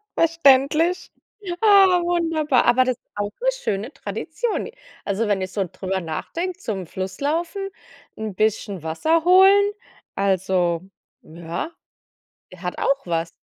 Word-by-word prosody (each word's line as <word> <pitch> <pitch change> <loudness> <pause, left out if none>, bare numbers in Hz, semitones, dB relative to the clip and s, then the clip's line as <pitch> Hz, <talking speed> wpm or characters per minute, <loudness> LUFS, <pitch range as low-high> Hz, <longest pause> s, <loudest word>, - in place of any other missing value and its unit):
Verständlich. 330 +2 +3 0.5
Ah, 390 -4 +6
wunderbar, 325 -6 +1
aber 255 +2 +5
das 255 -2 -1
ist - - -56
auch 205 0 -3
'ne - - +3
schöne 210 +8 -2
Tradition. 315 - -3
I 470 - -12 0.3
also, 205 +3 -1
wenn 200 -2 +1
ich 185 0 -5
so 200 -2 0
drüber 190 0 -3
nachdenke: 335 - -4
zum 195 - -4
Fluss 190 - -6
laufen, 340 +6 -2 0.5
'n 215 -3 -5
bisschen 205 -4 -1
Wasser 315 - +1
holen, 390 +3 +6 0.4
also, 185 -3 +1 0.4
ja, 170 - -6 0.8
der 185 - -13
hat 180 -1 -4
auch 275 -4 0
was. 165 -1 -1
245 Hz, 135 wpm, -22 LUFS, -, 0.8 s, Ah